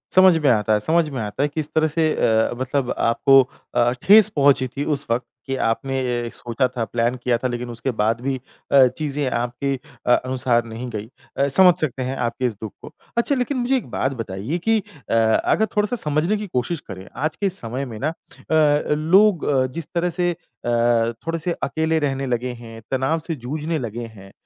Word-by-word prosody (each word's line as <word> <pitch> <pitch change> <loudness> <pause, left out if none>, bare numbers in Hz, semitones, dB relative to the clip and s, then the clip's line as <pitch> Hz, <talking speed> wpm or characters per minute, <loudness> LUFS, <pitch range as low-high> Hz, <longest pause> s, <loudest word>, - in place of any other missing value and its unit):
समझ 185 -3 +7
में 150 -4 +2
आता 110 -1 +2
है, 105 - +3
समझ 160 +7 +1
में 135 -3 -5
आता 105 +6 -2
है, - - +2
किस 155 0 -3
तरह 155 0 +3
से 160 0 +1
अ, 110 0 +2
मतलब 130 0 -1
आपको 135 +3 +5 0.3
अ, 120 0 +3
ठेस 210 +1 +7
पहुँची 140 -2 +4
थी 140 +3 -5
उस 145 -2 -1
वक़्त 120 +2 0 0.2
कि 135 - -1
आपने 135 +3 -1
ये 120 -2 -2
सोचा 120 +2 0
था, 125 -2 -4
प्लान 120 +3 0
किया 120 -2 +2
था, 130 - -2
लेकिन 120 0 -4
उसके 120 +2 -3
बाद 110 +2 +1
भी 135 +1 -1 0.4
अ, 135 -2 +7
चीज़ें 145 -3 -1
आपके 125 +4 -2 0.3
अ 125 - +4
अनुसार 125 -2 0
नहीं 115 +2 -6
गई। 110 -2 -5 0.3
अ, 140 +1 +2
समझ 180 +5 +6
सकते 135 -3 -2
हैं 130 +2 -3
आपके 125 +1 -2
इस 120 - 0
दुःख 110 - -5
को। - - -11 0.2
अच्छा, 275 +4 +2
लेकिन 255 +2 -1
मुझे 250 +2 +1
एक 250 - -6
बात 135 - 0
बताइए 105 - -4
कि 225 - +5
अ, 150 - -9
अगर 115 - +3
थोड़ा-सा 210 +3 +1
समझने 160 +2 0
की 210 -1 -5
कोशिश 150 +3 -2
करें। 95 0 -9
आज 155 +3 -2
के 205 - -3
इस 190 -1 0
समय 125 +4 -4
में 110 -4 -8
ना 150 - 0
अ, 165 - -12 0.2
अ, 150 -2 +4
लोग 185 +3 +4
अ, 135 -3 +2
जिस 155 +4 -6
तरह 175 +1 +1
से 175 0 +2
अ, 165 -7 -12 0.6
थोड़े-से 165 +1 -1
अकेले 160 0 0
रहने 135 -2 -1
लगे 125 0 -1
हैं, 115 -1 -10
तनाव 135 +5 +1
से 165 0 -4
जूझने 150 +5 -3
लगे 120 0 -5
हैं। 95 0 -13
135 Hz, 210 wpm, -22 LUFS, 120-160 Hz, 0.6 s, समझ